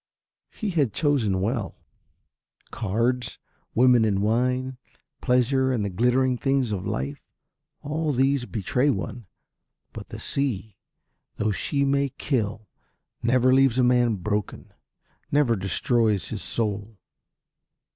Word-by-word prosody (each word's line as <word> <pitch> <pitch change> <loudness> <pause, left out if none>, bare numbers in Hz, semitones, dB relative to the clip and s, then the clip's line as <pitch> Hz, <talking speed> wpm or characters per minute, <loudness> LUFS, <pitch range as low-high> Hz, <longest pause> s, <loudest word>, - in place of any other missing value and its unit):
He 215 -4 -4
had 145 - +1
chosen 120 - +1
well. 110 0 -2 1.0
Cards, 120 +4 -1 0.4
women 125 -1 +5
and 100 -2 +1
wine, 125 +3 0 0.4
pleasure 130 +1 +2
and 115 -5 0
the 100 - -3
glittering 125 +5 +1
things 135 -4 +1
of 95 -3 -3
life, 70 +2 -3 0.6
all 155 +1 -1
these 135 -1 +1
betray 110 +8 0
one, 120 -5 -3 0.7
but - - -9
the - - -8
sea, 110 -8 -1 0.6
though 105 0 0
she 140 +7 0
may 140 0 +1
kill, 110 -6 -2 0.5
never 125 +2 +3
leaves 135 -2 +4
a 130 - +4
man 125 -2 +3
broken, 105 +2 -4 0.6
never 140 -5 +3
destroys 105 +2 +1
his 110 -3 -3
soul. 105 +1 -1
120 Hz, 115 wpm, -25 LUFS, 105-130 Hz, 1.0 s, women